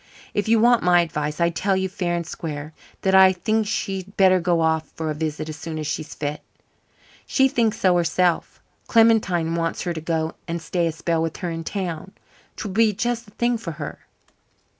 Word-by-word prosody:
If 205 +1 -1
you 225 0 +4
want 240 +1 +5
my 175 -1 +5
advice, 150 -2 -3
I 170 0 +3
tell 190 +3 0
you 190 0 0
fair 180 -2 -2
and 170 -1 -3
square 150 -2 -6 0.3
that 190 -1 +2
I 190 0 +8
think 215 +4 0
she'd 195 -2 -3
better 185 -1 +5
go 170 -1 +1
off 160 -1 +1
for 160 -1 -2
a - - -1
visit 155 0 -3
as 155 0 -6
soon 160 -2 -6
as 155 - -4
she's 155 +1 -4
fit. 150 0 -4 0.9
She 265 -1 +4
thinks 230 -4 0
so 185 -2 +4
herself. 175 0 +1 0.3
Clementine 210 -8 +3
wants 165 0 -1
her 175 - -2
to 160 - -5
go 160 0 -1
and 170 +1 -2
stay 170 +1 -1
a - - 0
spell 165 +1 -1
with 165 -1 -2
her 180 -3 -3
in 165 0 -4
town. 185 0 -4 0.4
'Twould 205 -3 -5
be 220 0 +4
just 235 +3 -2
the 205 - -18
thing 240 -1 +1
for 170 -7 -5
her." 150 -1 -7
175 Hz, 205 wpm, -23 LUFS, 160-200 Hz, 0.9 s, I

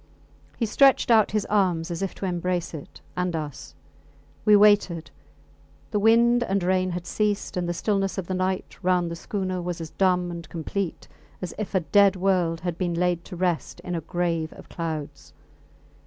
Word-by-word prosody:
He 230 - 0
stretched 270 +3 +4
out 220 -2 +5
his 210 -1 -1
arms 180 -5 +1
as 170 - -4
if 195 - -3
to - - -5
embrace 180 -1 -2
it 150 -3 -10
and 180 -1 -1
us. 150 -4 -6 0.7
We 210 -1 +7
waited. 205 -5 +4 0.8
The 210 - +1
wind 235 +3 +5
and 195 -4 0
rain 185 0 +2
had 175 0 -4
ceased, 210 0 -1
and 175 -1 -1
the - - 0
stillness 195 0 0
of 190 - -2
the 185 - -3
night 185 +1 -2
round 180 -2 +1
the - - -4
schooner 185 +1 -3
was 175 -1 -4
as 160 -2 -7
dumb 180 -2 +1
and 170 -2 -8
complete 175 +2 -4 0.3
as 180 - -5
if 210 -2 -4
a 190 - +3
dead 200 +3 +4
world 180 -3 +1
had 175 -1 -3
been 175 -2 -1
laid 175 0 0
to 185 - -8
rest 175 -2 -1
in 180 - -5
a 165 - -2
grave 165 -1 -1
of - - -14
clouds. 155 -4 -5
180 Hz, 185 wpm, -25 LUFS, 170-195 Hz, 0.8 s, We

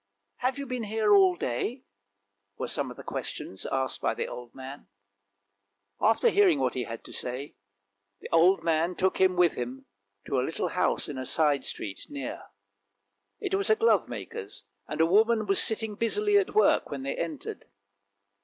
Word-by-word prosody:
Have 255 +2 -1
you 280 - -4
been 250 -3 -4
here 215 0 +2
all 190 -3 +6
day? 195 - -3 0.4
" 100 0 -52
were - - -3
some - - -2
of - - -10
the - - -9
questions 95 - -5
asked 130 -1 -2
by - - 0
the - - -2
old 120 -1 -9
man. 135 +2 -9 1.1
After 225 - +4
hearing 395 -7 +4
what - - 0
he 125 -2 -2
had 115 0 -7
to - - -12
say, 130 +4 -4 0.6
the - - -8
old 175 +4 +4
man 165 +2 +1
took 190 0 0
him 185 -1 +4
with 175 -2 +4
him 125 +2 -6 0.4
to 135 - 0
a - - +2
little 160 +6 -2
house 180 - 0
in 145 -4 -5
a 130 - -4
side 150 -3 +2
street 100 -2 -5
near. 300 +5 -6 0.9
It 390 -3 -4
was 395 0 +1
a 440 - +6
glovemaker's, 455 -1 -1 0.2
and 150 - -5
a - - +6
woman 215 +5 +3
was 195 -1 +4
sitting 220 -1 +1
busily 410 - +1
at 400 +1 -3
work 430 - +4
when 140 -2 -5
they 140 - -2
entered. 160 -5 -5
185 Hz, 180 wpm, -28 LUFS, -, 1.1 s, all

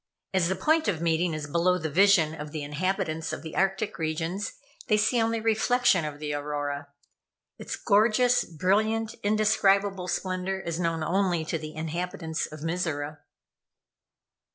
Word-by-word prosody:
As 185 -3 +3
the 190 - 0
point 315 - +2
of 175 -6 0
meeting 165 0 +1
is 155 -1 -4
below 170 +4 +2
the 160 -3 -3
vision 170 -1 +4
of 150 -1 -7
the 155 -1 -4
inhabitants 160 +1 -2
of - - -5
the 160 - -7
Arctic 195 +1 0
regions, 165 +5 -2 0.3
they 215 - +4
see 220 +3 +2
only 230 0 +1
the 220 - -5
reflection 225 -5 +3
of 150 -1 -5
the 150 0 -4
Aurora. 145 -1 -3 0.7
Its - - -4
gorgeous, 230 +4 +3
brilliant, 215 +7 0
indescribable 200 -3 +2
splendor 185 +1 -2
is 170 -2 -4
known 165 -2 0
only 175 -1 +1
to 165 +1 -2
the 155 0 -8
inhabitants 160 0 -3
of 155 -1 -10
Mizora. 155 -3 -2
180 Hz, 155 wpm, -27 LUFS, 155-200 Hz, 0.7 s, vision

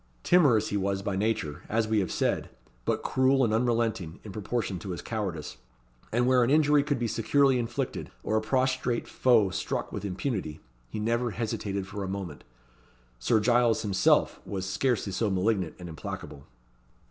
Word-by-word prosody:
Timorous 130 - +4
he 100 - -1
was 100 0 -1
by 100 -2 -2
nature, 95 -7 -1
as 110 0 +1
we 110 -1 +2
have 95 - -1
said, - - 0 0.4
but - - 0
cruel 130 +1 +3
and 110 -3 +2
unrelenting 115 -7 0
in 105 - -8
proportion 105 -1 -3
to 95 - -8
his 90 - -4
cowardice; 95 -9 -4 0.5
and 120 +2 +2
where 125 -1 +4
an 120 - +1
injury 150 0 +5
could 145 -1 -1
be 120 -1 -1
securely 130 +4 +3
inflicted, 120 +3 -3
or 110 - -1
a 110 - +3
prostrate 130 0 0
foe 115 -7 +3
struck - - -3
with - - -5
impunity, 95 - -3 0.3
he 105 - -5
never 115 +3 0
hesitated 105 -3 -3
for 100 +1 -6
a - - -3
moment. 95 -6 -5 0.8
Sir 85 - +3
Giles 120 +1 +3
himself 100 -3 +2
was 95 -2 -4
scarcely 110 +2 0
so 105 +3 0
malignant 95 -2 0
and 90 - -8
implacable. 80 -3 -7
110 Hz, 170 wpm, -28 LUFS, 95-120 Hz, 0.8 s, injury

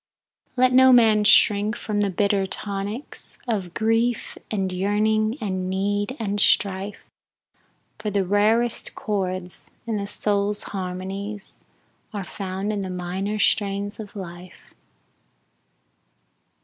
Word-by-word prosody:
Let 255 0 +4
no 260 0 +7
man 220 -4 +6
shrink 210 +1 +5
from 210 -3 -2
the 200 - +2
bitter 200 +1 +1
tonics 205 +6 -6
Of 195 -7 -2
grief, 225 +1 +1
and 190 -3 -1
yearning, 215 +4 +1
and 185 -4 -2
need, 205 +6 -1
and 205 -2 -1
strife, 195 +1 +1 1.0
For 210 - -2
the 200 -2 0
rarest 220 +5 +1
chords 185 -3 -3 0.2
in 225 -2 -1
the 200 -1 -3
soul's 205 0 -1
harmonies, 195 +2 -5 0.5
Are 205 -2 -3
found 195 +2 -4
in 205 - -2
the 190 - -4
minor 185 +3 -3
strains 200 0 0
of 210 -1 -8
life. 180 -2 -10
205 Hz, 115 wpm, -24 LUFS, 190-215 Hz, 1.0 s, no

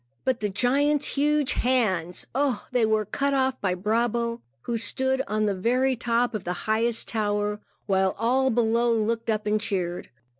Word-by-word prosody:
But 260 -2 +1
the 210 - -1
giant's 280 +8 +1
huge 295 0 +1
hands! 190 -9 0
Ah, 270 -1 -1
they 245 -3 +2
were 215 -1 +1
cut 280 +7 -1
off 260 -1 0
by 185 -2 0
Brabo, 230 +4 -1 0.2
who 235 - -2
stood 260 +4 +2
on 215 +1 0
the 205 - +1
very 250 +7 +1
top 240 0 0
of 215 -4 -4
the 180 - -2
highest 225 +1 +1
tower, 210 -1 -1 0.3
while 190 -1 +1
all 255 +4 +2
below 235 0 +2
looked 230 +1 -1
up 215 -1 0
and 210 0 +1
cheered. 180 -3 -3
230 Hz, 165 wpm, -25 LUFS, 210-255 Hz, 0.3 s, they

